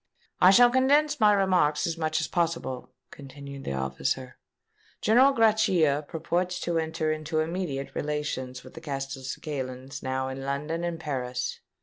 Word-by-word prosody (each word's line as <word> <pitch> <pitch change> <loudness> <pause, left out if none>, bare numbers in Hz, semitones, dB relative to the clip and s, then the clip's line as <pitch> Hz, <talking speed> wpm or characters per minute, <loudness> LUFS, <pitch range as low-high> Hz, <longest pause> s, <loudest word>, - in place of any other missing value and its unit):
"I 180 - +7
shall 240 +5 +7
condense 290 +3 +3
my 210 -2 +6
remarks 185 -7 +2
as 165 - -1
much 155 -1 -1
as 160 - -1
possible," 165 -7 -2 0.2
continued 140 0 -10
the - - -2
officer. 65 - -3 0.6
"General 250 +6 +5
Grachia 185 - +3
purports 175 +2 -2
to 170 -1 0
enter 160 -1 -1
into 155 +1 -2
immediate 155 -4 -3
relations 145 -4 -3
with - - -13
the 160 - -10
Castelcicalans 135 -1 -5
now 130 0 -2
in 135 0 -6
London 150 +5 -3
and 170 -1 -3
Paris. 125 -5 -3
155 Hz, 140 wpm, -27 LUFS, 135-175 Hz, 0.6 s, I